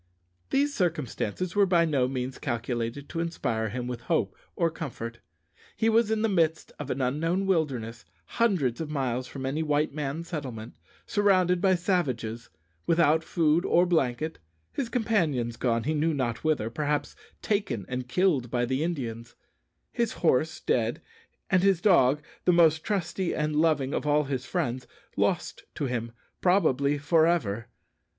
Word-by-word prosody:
These 285 Hz, +1 st, +1 dB
circumstances 170 Hz, -, -2 dB
were 200 Hz, -1 st, +4 dB
by 170 Hz, -2 st, +4 dB
no 140 Hz, -6 st, +1 dB
means 130 Hz, 0 st, -4 dB
calculated 120 Hz, +2 st, -3 dB
to 165 Hz, -, -4 dB
inspire 115 Hz, -10 st, -1 dB
him 120 Hz, +3 st, -4 dB
with 125 Hz, -1 st, -5 dB
hope 165 Hz, +6 st, 0 dB, 0.2 s
or 165 Hz, -2 st, +1 dB
comfort. 120 Hz, -7 st, -6 dB, 0.6 s
He 225 Hz, +1 st, +2 dB
was 225 Hz, 0 st, +3 dB
in 220 Hz, 0 st, 0 dB
the -, -, +4 dB
midst 165 Hz, -5 st, +1 dB
of 145 Hz, -2 st, -6 dB
an 135 Hz, -, -2 dB
unknown 165 Hz, +9 st, 0 dB
wilderness, 135 Hz, -11 st, -1 dB, 0.2 s
hundreds 170 Hz, -, +1 dB
of 160 Hz, -, -4 dB
miles 130 Hz, -4 st, -2 dB
from 135 Hz, -1 st, -6 dB
any 140 Hz, +4 st, -1 dB
white 150 Hz, -1 st, +1 dB
man's 150 Hz, +3 st, -4 dB
settlement; 125 Hz, -9 st, -5 dB, 0.3 s
surrounded 185 Hz, -4 st, +3 dB
by 190 Hz, -1 st, +4 dB
savages; 130 Hz, -, -1 dB, 0.4 s
without 165 Hz, -1 st, +3 dB
food 160 Hz, 0 st, +2 dB
or 175 Hz, -1 st, +4 dB
blanket; 155 Hz, -2 st, 0 dB, 0.3 s
his 255 Hz, -4 st, -3 dB
companions 165 Hz, -, 0 dB
gone, 115 Hz, -1 st, 0 dB
he 155 Hz, -, 0 dB
knew 155 Hz, +1 st, +1 dB
not 120 Hz, -5 st, -2 dB
whither 150 Hz, -8 st, 0 dB
perhaps 145 Hz, +2 st, -2 dB, 0.3 s
taken 145 Hz, -, -1 dB
and 125 Hz, 0 st, -4 dB
killed 135 Hz, -3 st, +1 dB
by 120 Hz, 0 st, 0 dB
the 130 Hz, +4 st, -1 dB
Indians; 120 Hz, -9 st, -4 dB, 0.6 s
his 235 Hz, -2 st, -1 dB
horse 160 Hz, -1 st, +1 dB
dead; 115 Hz, -1 st, 0 dB, 0.5 s
and 185 Hz, -1 st, +3 dB
his 195 Hz, -2 st, +3 dB
dog, 150 Hz, -7 st, +4 dB, 0.2 s
the 180 Hz, -, +5 dB
most 160 Hz, -2 st, +4 dB
trusty 190 Hz, -2 st, -1 dB
and 150 Hz, 0 st, -1 dB
loving 150 Hz, -4 st, +2 dB
of -, -, -2 dB
all 150 Hz, +1 st, +3 dB
his 135 Hz, -2 st, -4 dB
friends, 125 Hz, +2 st, -2 dB, 0.3 s
lost 180 Hz, -4 st, -1 dB
to 145 Hz, -, -2 dB
him, 120 Hz, -2 st, -3 dB, 0.3 s
probably, 145 Hz, -7 st, +3 dB
for 160 Hz, +3 st, +3 dB
ever! 115 Hz, -10 st, 0 dB
150 Hz, 155 wpm, -27 LUFS, 125-175 Hz, 0.6 s, the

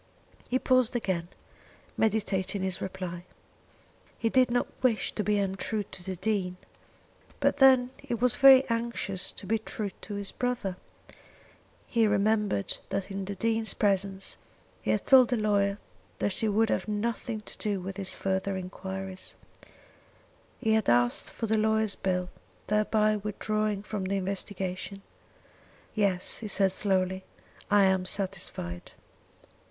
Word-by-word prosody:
He 255 Hz, -, +2 dB
paused 255 Hz, -2 st, +2 dB
again, 185 Hz, -7 st, -1 dB, 0.7 s
meditating 200 Hz, -3 st, 0 dB
his 190 Hz, 0 st, -1 dB
reply. 185 Hz, -2 st, -5 dB, 0.9 s
He 230 Hz, -, 0 dB
did 255 Hz, +1 st, +4 dB
not 245 Hz, +1 st, +1 dB, 0.2 s
wish 245 Hz, -4 st, +2 dB
to 210 Hz, -, -2 dB
be 210 Hz, 0 st, +2 dB
untrue 200 Hz, +2 st, -1 dB
to 180 Hz, -, -7 dB
the 190 Hz, 0 st, -4 dB
Dean, 185 Hz, -2 st, -1 dB, 0.8 s
but -, -, +2 dB
then 260 Hz, -2 st, +6 dB
he 275 Hz, -4 st, -4 dB
was 245 Hz, +1 st, +2 dB
very 270 Hz, -1 st, +8 dB
anxious 230 Hz, -5 st, -2 dB
to -, -, -8 dB
be 220 Hz, +4 st, +1 dB
true 215 Hz, -2 st, -4 dB
to 205 Hz, -, -6 dB
his 200 Hz, -1 st, -3 dB
brother. 245 Hz, -7 st, -2 dB, 1.1 s
He 230 Hz, -2 st, +2 dB
remembered 205 Hz, -, +1 dB
that 195 Hz, 0 st, -3 dB
in 195 Hz, 0 st, -4 dB
the 200 Hz, +1 st, -5 dB
Dean's 225 Hz, +2 st, +1 dB
presence 195 Hz, -1 st, 0 dB, 0.4 s
he -, -, -4 dB
had -, -, +1 dB
told 260 Hz, -3 st, +7 dB
the 245 Hz, -, +1 dB
lawyer 200 Hz, -2 st, +1 dB, 0.4 s
that 200 Hz, -, 0 dB
he 220 Hz, -, -1 dB
would 220 Hz, +2 st, +2 dB
have -, -, -1 dB
nothing 220 Hz, +1 st, -2 dB
to -, -, -10 dB
do 205 Hz, -2 st, -1 dB
with 190 Hz, +1 st, -6 dB
further 190 Hz, 0 st, -1 dB
enquiries. 190 Hz, 0 st, -7 dB, 1.2 s
He 220 Hz, -3 st, +1 dB
had 220 Hz, -2 st, +2 dB
asked 120 Hz, 0 st, +3 dB
for 230 Hz, -, -4 dB
the 220 Hz, 0 st, +1 dB
lawyer's 220 Hz, -1 st, +2 dB
bill, 180 Hz, -1 st, -2 dB, 0.3 s
thereby 215 Hz, 0 st, +2 dB
withdrawing 210 Hz, 0 st, -2 dB
from 210 Hz, -2 st, -4 dB
the 195 Hz, +1 st, -1 dB
investigation. 190 Hz, 0 st, -3 dB, 0.9 s
"Yes," 195 Hz, -4 st, +1 dB
he 220 Hz, -, -5 dB
said 195 Hz, -1 st, +2 dB
slowly; 190 Hz, -1 st, +1 dB, 0.5 s
"I 205 Hz, -1 st, +5 dB
am 190 Hz, -1 st, +2 dB
satisfied." 180 Hz, -, -2 dB
200 Hz, 140 wpm, -28 LUFS, 190-220 Hz, 1.2 s, very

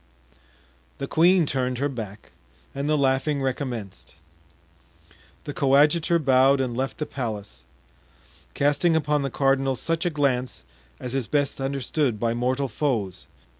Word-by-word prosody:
The -, -, -3 dB
queen 175 Hz, +1 st, +4 dB
turned 130 Hz, -3 st, -1 dB
her 140 Hz, +3 st, 0 dB
back 110 Hz, -7 st, -8 dB, 0.4 s
and 140 Hz, +2 st, -3 dB
the 155 Hz, -, +3 dB
laughing 140 Hz, +1 st, +1 dB
recommenced. 125 Hz, -7 st, -4 dB, 1.3 s
The 145 Hz, -, -6 dB
coadjutor 150 Hz, +5 st, +3 dB
bowed 135 Hz, -2 st, +4 dB
and 125 Hz, -3 st, -1 dB
left 130 Hz, +1 st, -2 dB
the 150 Hz, -, -2 dB
palace, 105 Hz, -, -6 dB, 0.9 s
casting 145 Hz, +4 st, +2 dB
upon 150 Hz, -2 st, +1 dB
the 135 Hz, -, -2 dB
cardinal 135 Hz, 0 st, +1 dB
such 165 Hz, +5 st, -1 dB
a 175 Hz, -, +1 dB
glance 135 Hz, -5 st, -1 dB, 0.4 s
as 125 Hz, -, -5 dB
is 135 Hz, -4 st, -1 dB
best 145 Hz, -2 st, 0 dB
understood 135 Hz, -2 st, -1 dB
by 115 Hz, 0 st, 0 dB
mortal 130 Hz, +3 st, 0 dB
foes. 110 Hz, -, -2 dB
135 Hz, 130 wpm, -24 LUFS, 125-145 Hz, 1.3 s, queen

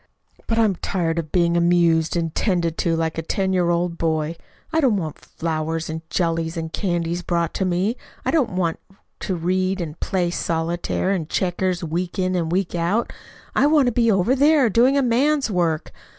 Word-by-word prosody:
But 225 Hz, -, 0 dB
I'm 215 Hz, -5 st, +3 dB
tired 170 Hz, -3 st, -1 dB
of 155 Hz, -2 st, -5 dB
being 170 Hz, -1 st, +2 dB
amused 170 Hz, -1 st, +3 dB
and 165 Hz, -2 st, -2 dB
'tended 170 Hz, -5 st, 0 dB
to 165 Hz, -1 st, +1 dB
like 165 Hz, 0 st, -1 dB
a -, -, -1 dB
ten 190 Hz, +3 st, -1 dB
year 180 Hz, -2 st, +2 dB
old 170 Hz, 0 st, 0 dB
boy. 160 Hz, 0 st, 0 dB, 0.4 s
I 320 Hz, -, +3 dB
don't 245 Hz, -8 st, +3 dB
want 155 Hz, -5 st, -4 dB
flowers 160 Hz, 0 st, -3 dB
and 160 Hz, 0 st, -5 dB
jellies 165 Hz, -1 st, -1 dB
and 160 Hz, -1 st, -5 dB
candies 175 Hz, -3 st, -1 dB
brought 170 Hz, -2 st, -1 dB
in -, -, -3 dB
to 190 Hz, -, +1 dB
me. 185 Hz, +6 st, 0 dB, 0.3 s
I -, -, +1 dB
don't 275 Hz, -, +1 dB
want 170 Hz, -3 st, 0 dB, 0.4 s
to 190 Hz, -, -2 dB
read 185 Hz, +3 st, 0 dB
and 165 Hz, -2 st, -5 dB
play 180 Hz, -2 st, 0 dB
solitaire 170 Hz, +3 st, -1 dB
and 170 Hz, -5 st, -2 dB
checkers 180 Hz, -1 st, -1 dB
week 170 Hz, +4 st, -3 dB
in 185 Hz, -1 st, 0 dB
and 170 Hz, -3 st, -1 dB
week 185 Hz, 0 st, 0 dB
out. 175 Hz, +7 st, 0 dB, 0.4 s
I 280 Hz, -, +4 dB
want 295 Hz, -2 st, +4 dB
to -, -, -2 dB
be 230 Hz, -1 st, +3 dB
over 195 Hz, +5 st, +2 dB
there, 285 Hz, -3 st, +4 dB
doing 250 Hz, +6 st, +4 dB
a 280 Hz, -, +3 dB
man's 265 Hz, +2 st, +2 dB
work. 170 Hz, -4 st, 0 dB
175 Hz, 195 wpm, -22 LUFS, 165-195 Hz, 0.4 s, I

